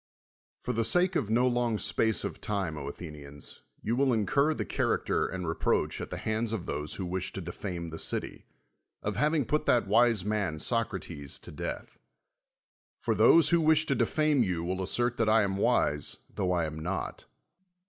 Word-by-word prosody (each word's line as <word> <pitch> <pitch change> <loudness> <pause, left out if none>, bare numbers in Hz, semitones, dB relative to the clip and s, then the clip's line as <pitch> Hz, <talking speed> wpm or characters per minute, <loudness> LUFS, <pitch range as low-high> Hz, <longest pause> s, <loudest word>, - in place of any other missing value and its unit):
For 125 - -4
the 115 0 +1
sake 180 - +3
of 115 -10 0
no 120 +3 +3
long 120 -2 +1
space 110 +1 +1
of - - -5
time, 100 -6 -2
Athe 75 +3 -7
nians, 70 -1 -8 0.2
you 115 - 0
will 135 0 +3
incur 140 +8 +2
the - - -3
character - - 0
and 90 -1 -5
reproach 80 - 0
at - - -5
the - - -5
hands 110 +1 -1
of 110 -6 -3
those 75 +1 -3
who 95 - -4
wish 90 +1 -2
to - - -4
defame 85 -1 -5
the 80 - -7
city, - - -4 0.6
of - - -2
having 150 -2 +2
put 150 +6 0
that 120 -4 +4
wise 110 -1 +3
man, 105 -7 -1
Socrates, 90 - -2
to - - -10
death. - - -6 1.0
For - - 0
those 140 +8 +6
who 170 -1 +4
wish 155 0 +4
to - - +1
defame 150 -3 +2
you 90 -6 0
will 95 +2 -2
assert 120 +5 +1
that 115 -2 +2
I 110 0 +5
am 95 -1 -1
wise, 75 -6 +2 0.2
tho 90 - -1
I 85 -2 +1
am 80 0 -5
not. 90 +3 -4
105 Hz, 185 wpm, -29 LUFS, 85-120 Hz, 1.0 s, those